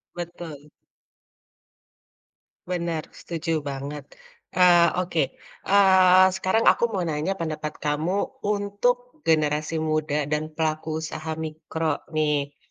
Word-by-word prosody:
Betul. 170 -4 -8 2.0
Benar, 170 -3 -2
setuju 165 -1 -3
banget. 140 +2 -5 0.5
Eee, 175 -2 +6
oke, 180 -2 0 0.5
eee, 190 -2 +6
sekarang 190 +4 +1
aku - - +5
mau 190 -3 -1
nanya 160 +4 -1
pendapat 155 -3 -4
kamu 155 +7 -2
untuk 210 +7 -1
generasi 155 0 +1
muda 150 -1 0
dan 150 +1 0
pelaku 155 0 -1
usaha 160 0 -5
mikro 160 -1 -3 0.2
nih. 150 -2 0
160 Hz, 100 wpm, -25 LUFS, 155-185 Hz, 2.0 s, Eee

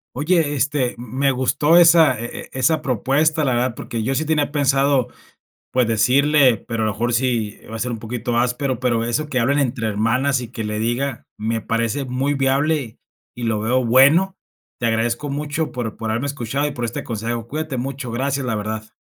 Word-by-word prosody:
Oye, 155 +1 +1
este, 140 -2 0
mm, 120 +1 -9
me 140 0 +3
gustó 130 +5 +2
esa 165 -7 +6
e 120 - -4 0.2
e - - -12
esa 135 +5 +1
propuesta, 150 +5 +1
la 130 -3 +1
verdad, 120 0 0
porque 115 -1 -5
yo 130 +5 -1
sí 155 - 0
tenía 150 -2 0
pensado, 140 -2 +2 0.6
pues, 125 -2 +2
decirle, 130 +3 +4
pero 115 -1 -2
a - - +1
lo - - 0
mejor 120 +3 -2
sí 115 -4 0
va 115 - -5
a - - -8
ser 125 +2 -2
un 115 - -4
poquito 120 +1 -3
áspero, 125 +1 0
pero 120 -2 0
eso 130 +6 -2
que 130 - 0
hablen 140 +5 +2
entre 120 -4 -1
hermanas 125 +6 +1
y 120 - -7
que 115 -3 -5
le 105 0 -3
diga, 120 +3 -2
me 110 +1 -2
parece 115 +5 -1
muy 130 +2 -1
viable 135 -2 0 0.4
y 120 - -7
lo 110 -2 0
veo 125 +3 +1
bueno. 145 +11 +5 0.4
Te 120 - -2
agradezco 115 +5 -1
mucho 150 +2 -2
por 120 -3 -4
por 110 -1 -4
haberme 120 +6 -1
escuchado 140 +1 -2
y - - -3
por 120 -3 -4
este 115 - -4
consejo. 115 0 -4
Cuídate 155 0 -4
mucho, 130 -1 -4
gracias, 135 +2 -1
la 120 -3 -1
verdad. 110 +1 -5
125 Hz, 200 wpm, -20 LUFS, 115-140 Hz, 0.6 s, esa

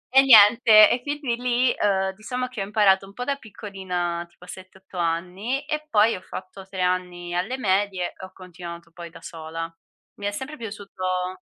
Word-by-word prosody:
E 270 - +10
niente 215 -2 +8
e 245 - 0
quindi 285 -5 -2
lì, 245 +1 +1
uhm, 190 -2 +1
diciamo 250 +5 -4
che 250 -5 -6
ho 195 - -1
imparato 195 -2 +3
un 195 - -14
po' 245 +3 -5
da 280 +1 0
piccolina 185 -7 -4
tipo 175 +1 -18
a - - -18
7, 185 +1 -11
8 190 -1 -13
anni 185 - -2
e 305 0 -3
poi 215 -1 +4
ho 185 - -8
fatto 190 +1 -9
3 190 -1 -5
anni 180 -1 -1
alle 215 +9 -1
medie 195 -4 0
e - - -10
ho 185 - -14
continuato 170 -2 -10
poi 170 -1 -9
da - - -13
sola. 165 0 -6 0.5
Mi 200 - -6
è - - -1
sempre 265 +8 -6
piaciuto 185 -4 -4
195 Hz, 190 wpm, -24 LUFS, 180-230 Hz, 0.5 s, E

